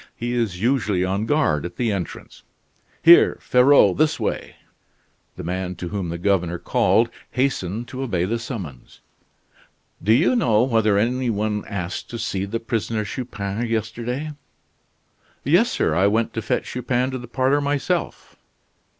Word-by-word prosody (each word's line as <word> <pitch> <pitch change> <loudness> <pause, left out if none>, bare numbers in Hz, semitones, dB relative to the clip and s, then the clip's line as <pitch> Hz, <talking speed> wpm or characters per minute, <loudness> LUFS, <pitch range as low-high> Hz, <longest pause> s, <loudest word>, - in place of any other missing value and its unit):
He 120 +1 -3
is 110 -7 -1
usually 105 -5 +1
on 100 +4 -1
guard 115 - +1
at 85 0 -6
the 115 +1 0
entrance. 95 -5 -6 0.6
Here, 170 +1 +7
Ferraud, 125 -5 +4
this 155 +1 +2
way!" - - -3 0.8
The - - -7
man 90 +1 -3
to 85 +1 -6
whom 95 -3 -3
the 85 - -4
governor 90 -2 0
called - - +2 0.2
hastened 120 -4 -1
to 130 - -6
obey 95 -10 -1
the 115 +5 -2
summons. 95 - -8 1.0
"Do 105 - +1
you 125 - +4
know 115 - +3
whether 110 -5 +2
any 125 +4 0
one 105 -1 -1
asked 90 -3 -5
to 120 - -5
see 100 -4 -2
the 115 +3 -3
prisoner 115 -1 -2
Chupin 110 -2 -4
yesterday?" 115 +6 -3 1.1
"Yes, 175 - +4
sir, - - 0
I 95 - +3
went 110 +2 0
to 115 - -3
fetch 110 - -1
Chupin 125 +1 -1
to 130 - -4
the 120 - -9
parlor 130 +4 +1
myself." 145 0 -2
115 Hz, 150 wpm, -22 LUFS, 100-125 Hz, 1.1 s, Here